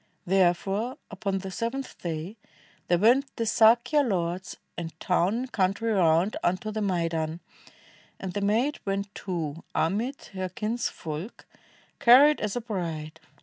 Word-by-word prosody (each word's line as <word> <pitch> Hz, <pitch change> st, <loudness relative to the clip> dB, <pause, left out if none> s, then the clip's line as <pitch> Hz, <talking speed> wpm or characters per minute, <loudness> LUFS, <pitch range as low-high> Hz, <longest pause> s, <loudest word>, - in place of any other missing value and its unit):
Therefore, 195 Hz, +7 st, +1 dB
upon 195 Hz, -1 st, -2 dB
the 190 Hz, 0 st, -6 dB
seventh 235 Hz, +7 st, -4 dB
day, 170 Hz, +4 st, -4 dB, 0.5 s
there 175 Hz, -, +3 dB
went 245 Hz, +9 st, +4 dB
The 230 Hz, -, -1 dB
Sakya 230 Hz, +6 st, +4 dB
lords 180 Hz, -6 st, -2 dB, 0.2 s
and 165 Hz, -1 st, -7 dB
town 180 Hz, +3 st, +1 dB
and 250 Hz, +1 st, -4 dB
countn, 190 Hz, -1 st, +1 dB
round 190 Hz, -4 st, +2 dB
Unto 185 Hz, +5 st, 0 dB
the 215 Hz, 0 st, -3 dB
maidan; 165 Hz, -4 st, -1 dB, 0.8 s
and 190 Hz, -2 st, -5 dB
the 205 Hz, -, -2 dB
maid 225 Hz, +9 st, +1 dB
went 195 Hz, 0 st, -3 dB
too 165 Hz, -4 st, -4 dB
Amid 220 Hz, -, -1 dB
her 185 Hz, -1 st, -3 dB
kinsfolk, 210 Hz, -4 st, -4 dB, 0.5 s
carried 280 Hz, +5 st, +7 dB
as 210 Hz, -2 st, -2 dB
a 245 Hz, -, -1 dB
bride. 165 Hz, -8 st, -4 dB
195 Hz, 135 wpm, -27 LUFS, 175-230 Hz, 0.8 s, carried